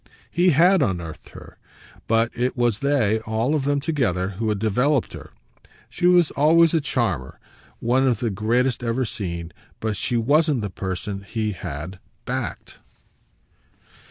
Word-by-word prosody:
He 175 +2 +3
HAD 175 +4 +5
unearthed 85 - -3
her, - - -13 0.5
but 115 +1 +2
it 125 +2 -1
was 120 -4 +1
they, 130 -7 +2
all 110 +5 -1
of 145 -3 0
them 145 0 +1
together, 125 - 0
who 110 +3 -3
had 105 - 0
developed 125 +6 +1
her. - - -10 0.6
She 175 - +1
was 175 -3 +4
always 165 +3 +4
a 165 - +2
charmer, 110 - -2 0.4
one 130 +3 +2
of 120 -5 +1
the 115 -3 -1
greatest 120 +5 0
ever 120 +2 0
seen, 85 -6 -5 0.3
but 110 -1 -2
she 120 +5 -1
wasn't 145 +3 +2
the 105 -2 -4
person 95 +2 -4
he 110 +1 -3
had 90 0 -7 0.3
"backed." - - -5
115 Hz, 150 wpm, -23 LUFS, 100-140 Hz, 0.6 s, HAD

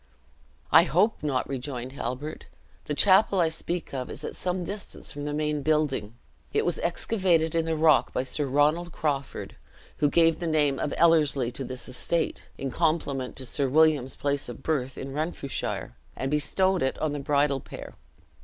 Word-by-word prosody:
"I 165 - +8
hope 190 +7 +2
not," 140 -4 -1
rejoined 130 -2 -5
Halbert; 135 +3 -5 0.4
"the 150 - -2
chapel 195 +2 +5
I 165 -2 +3
speak 170 +1 -4
of 130 -2 -4
is - - -7
at - - -5
some 180 0 -2
distance 200 +4 -6
from 145 0 -6
the 150 - -2
main 150 0 -1
building. 145 -8 0 0.4
It - - +1
was 175 - 0
excavated 170 -3 +1
in 165 -1 +1
the 165 0 0
rock 155 0 +4
by 125 - -1
Sir 140 +2 -2
Ronald 150 +6 +2
Crawford, 140 -5 -3 0.4
who 145 -1 +3
gave 165 +1 +4
the 170 - -3
name 150 -4 +2
of 145 - -1
Ellerslie 150 -7 +3
to 135 - -5
this 125 -1 -6
estate, 160 +6 -2
in 135 -1 -4
compliment 150 -6 0
to 130 - -7
Sir 135 +2 0
William's 150 -3 +3
place 140 -2 -1
of 120 - -9
birth 135 -5 -1
in 135 0 -6
Renfrewshire, 145 - -3 0.2
and 135 +1 -3
bestowed 185 +5 +2
it 130 - 0
on 155 -2 -1
the 145 - -3
bridal 140 0 +1
pair. - - -10
150 Hz, 175 wpm, -27 LUFS, 135-165 Hz, 0.4 s, I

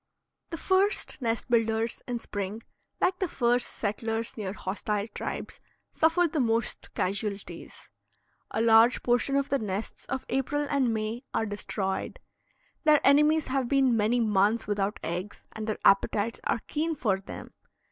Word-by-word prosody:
The 330 - -4
first 380 -3 +1
nest 230 -1 -1
builders 225 -1 +1
in 245 -1 -2
spring, 205 0 -5 0.4
like 365 0 +1
the 375 - 0
first 245 -4 +1
settlers 225 +2 -3
near 205 -4 -4
hostile 205 +1 -3
tribes, - - -5 0.3
suffer 330 +2 +3
the 310 -1 -2
most 230 -2 -1
casualties. 200 +1 -4 0.6
A 220 - 0
large 230 +2 +5
portion 245 +3 +2
of 280 0 +1
the 275 - +1
nests 205 0 -4
of 265 0 -4
April 275 +3 0
and 275 -4 +1
May 220 +3 -3
are 225 - +1
destroyed; 205 -2 -3 0.6
their 305 -2 +6
enemies 300 +2 +5
have 260 -1 0
been 270 -3 +3
many 225 +3 +2
months 215 0 +2
without 205 0 -1
eggs 180 +5 -5
and 220 0 -6
their 215 - -1
appetites 205 +3 +3
are 230 - 0
keen 320 +2 -1
for 205 -8 0
them. 195 - -9
230 Hz, 145 wpm, -28 LUFS, 210-275 Hz, 0.6 s, their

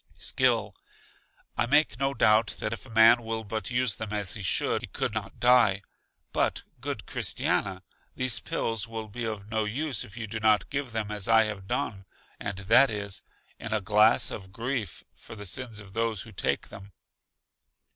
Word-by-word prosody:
Skill: 115 -5 +1 0.8
I 120 - +1
make 140 -4 +3
no 135 0 0
doubt 110 +1 +4
that 110 - -2
if 115 - -8
a - - -15
man 115 +2 +6
will 110 -1 -3
but 110 -1 -4
use 120 -2 +1
them 110 -2 -5
as 100 -5 -1
he - - -6
should, 95 - +1
he - - -6
could - - -3
not - - -5
die. 120 -6 +5 0.5
But - - 0 0.2
good - - -4
Christiana, 95 -1 -1 0.3
these 130 -5 +2
pills 115 +2 -2
will 110 -1 -6
be 115 +3 -5
of 105 -2 -5
no 110 -1 +1
use 130 +2 -1
if 100 +4 -13
you 115 - -4
do 110 +1 -5
not 110 0 +3
give 140 -3 -2
them 110 -2 -3
as 105 -2 -3
I 115 0 +6
have 105 -3 -4
done, 100 -8 -2 0.3
and 100 -2 -4
that 110 +8 +5
is, 100 -2 -2 0.4
in 110 - -6
a 110 - +2
glass 105 +3 +4
of 95 -2 -7
grief 115 -3 -3
for - - -11
the 105 -1 -8
sins 115 +2 -4
of 100 -2 -12
those 115 -2 -1
who 115 - -12
take 95 - -1
them. 100 0 -11
110 Hz, 185 wpm, -28 LUFS, 100-120 Hz, 0.8 s, man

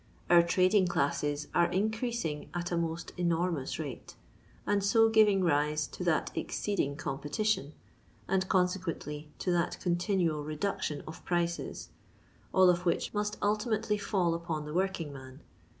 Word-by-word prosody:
Our 175 0 +9
trading 185 +3 +3
classes 145 -3 0
are 170 0 +4
in 205 +4 +1
creasing 220 -10 -3
at 175 0 -3
a - - +1
most 165 0 -2
enormous 170 -4 0
rate, 145 -5 -7 0.5
and 205 -1 +1
so 225 +3 +5
giving 210 -3 +5
rise 150 -2 +2
to - - -6
that 160 -3 +1
exceeding 170 -9 -1
competition, 150 +3 -1 0.5
and 190 0 0
conse 180 -1 +3
quently, 150 -4 -5
to 180 - -1
that 175 0 0
continual 175 -3 0
reduction 155 0 -3
of 160 - -9
prices 170 -1 -2 0.3
— - - -31
all 185 -1 +6
of 175 0 -1
which 175 - 0
must 210 0 -1
ultimately 210 0 0
foil 190 -4 +1
upon 165 -2 -3
the 150 - -6
working 180 -4 -1
man. 130 0 -11
175 Hz, 150 wpm, -31 LUFS, 155-195 Hz, 0.5 s, Our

